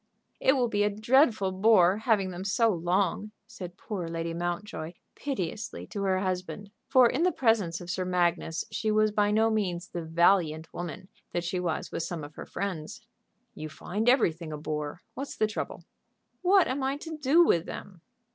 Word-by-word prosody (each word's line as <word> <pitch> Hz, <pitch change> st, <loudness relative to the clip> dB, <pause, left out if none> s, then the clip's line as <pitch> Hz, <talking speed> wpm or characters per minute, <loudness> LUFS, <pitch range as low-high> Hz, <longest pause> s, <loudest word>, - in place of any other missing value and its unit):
"It 265 Hz, -, +4 dB
will 255 Hz, -3 st, +2 dB
be 205 Hz, -2 st, 0 dB
a 205 Hz, -, +3 dB
dreadful 215 Hz, -1 st, +3 dB
bore 190 Hz, -1 st, +5 dB
having 215 Hz, -4 st, +1 dB
them 180 Hz, +1 st, -6 dB
so 225 Hz, +3 st, +2 dB
long," 185 Hz, +2 st, 0 dB, 0.2 s
said 185 Hz, -6 st, -9 dB
poor 190 Hz, -6 st, -5 dB
Lady 165 Hz, 0 st, -3 dB
Mountjoy, 175 Hz, -1 st, -4 dB, 0.2 s
piteously, 220 Hz, -, -4 dB
to 205 Hz, -, -6 dB
her 190 Hz, -1 st, +1 dB
husband. 185 Hz, +2 st, -3 dB, 0.2 s
For 255 Hz, -2 st, +6 dB
in 310 Hz, -, -1 dB
the 360 Hz, +1 st, +4 dB
presence 215 Hz, -, +1 dB
of 175 Hz, -, -9 dB
Sir 185 Hz, 0 st, -1 dB
Magnus 175 Hz, -2 st, 0 dB
she 220 Hz, -, -1 dB
was 215 Hz, 0 st, +3 dB
by 205 Hz, 0 st, +2 dB
no 220 Hz, +2 st, +3 dB
means 185 Hz, -5 st, -1 dB
the 175 Hz, -, -4 dB
valiant 165 Hz, -1 st, +2 dB
woman 175 Hz, +1 st, -6 dB, 0.3 s
that 175 Hz, -, -1 dB
she 180 Hz, +1 st, -2 dB
was 170 Hz, -3 st, -2 dB
with -, -, -3 dB
some 165 Hz, -1 st, -4 dB
of 145 Hz, +1 st, -9 dB
her -, -, -9 dB
friends. 185 Hz, -6 st, -4 dB, 0.5 s
"You 155 Hz, 0 st, -7 dB
find 205 Hz, +10 st, -1 dB
everything 170 Hz, -, +2 dB
a 150 Hz, -, -4 dB
bore. 150 Hz, +2 st, -4 dB
What's 275 Hz, +1 st, -6 dB
the 215 Hz, -, +3 dB
trouble?" 215 Hz, -, -5 dB, 0.6 s
"What 370 Hz, 0 st, +5 dB
am 265 Hz, +2 st, -2 dB
I 270 Hz, +1 st, 0 dB
to 320 Hz, +2 st, -7 dB
do 305 Hz, +3 st, +5 dB
with 170 Hz, -, +2 dB
them?" 185 Hz, -4 st, -8 dB
190 Hz, 185 wpm, -28 LUFS, 170-220 Hz, 0.6 s, For